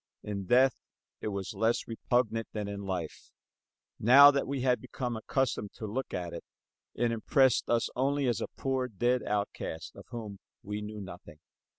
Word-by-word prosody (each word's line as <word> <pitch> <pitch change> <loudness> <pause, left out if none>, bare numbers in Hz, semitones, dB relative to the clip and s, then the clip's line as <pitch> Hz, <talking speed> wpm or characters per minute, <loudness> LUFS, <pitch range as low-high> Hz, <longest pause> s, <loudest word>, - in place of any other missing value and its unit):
In 100 -2 -4
death 130 +3 +5 0.5
it - - -4
was 100 -1 -3
less 110 +3 +1
repugnant 115 0 0
than 105 -2 -3
in 100 0 -5
life. 90 -5 -5 0.7
Now 140 +6 +9
that 140 -1 -1
we 135 -1 -2
had 125 -1 +2
become 125 -1 -4
accustomed 110 -2 -1
to 110 - -6
look 125 +6 -3
at 90 -2 -4
it, 85 - -6 0.5
it 120 0 +1
impressed 130 +3 +3
us 115 -1 +2
only 140 +2 +1
as 120 -2 0
a - - -2
poor 130 -1 0
dead 120 +3 +1
outcast, 100 -6 -3
of - - -12
whom 110 -4 -7 0.2
we 105 +1 -4
knew 105 0 -6
nothing. 85 -4 -10
115 Hz, 170 wpm, -30 LUFS, 100-125 Hz, 0.7 s, Now